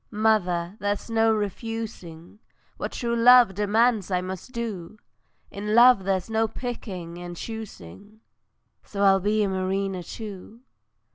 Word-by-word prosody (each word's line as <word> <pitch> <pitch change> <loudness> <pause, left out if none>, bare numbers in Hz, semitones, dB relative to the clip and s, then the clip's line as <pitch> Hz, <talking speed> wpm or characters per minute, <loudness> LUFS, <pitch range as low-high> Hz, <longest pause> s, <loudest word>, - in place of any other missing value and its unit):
Mother, 205 -4 0
there's 205 +3 -3
no 225 0 +3
refusing, 210 -4 -5 0.4
What - - -5
true 235 -1 -2
love 240 -2 +7
demands 210 +1 +1
I 180 -1 +1
must 185 +5 -7
do; 220 -5 -5 0.5
In 210 +2 -3
love 240 -5 +6
there's 190 -2 0
no 225 0 +1
picking 195 -8 -6
and 175 -1 -8
choosing, 215 - -9 0.6
So 200 -1 -3
I'll 195 -1 +5
be 210 +2 +1
a - - +1
mariner 190 0 -2
too. 210 +4 -9
205 Hz, 130 wpm, -25 LUFS, 185-225 Hz, 0.6 s, love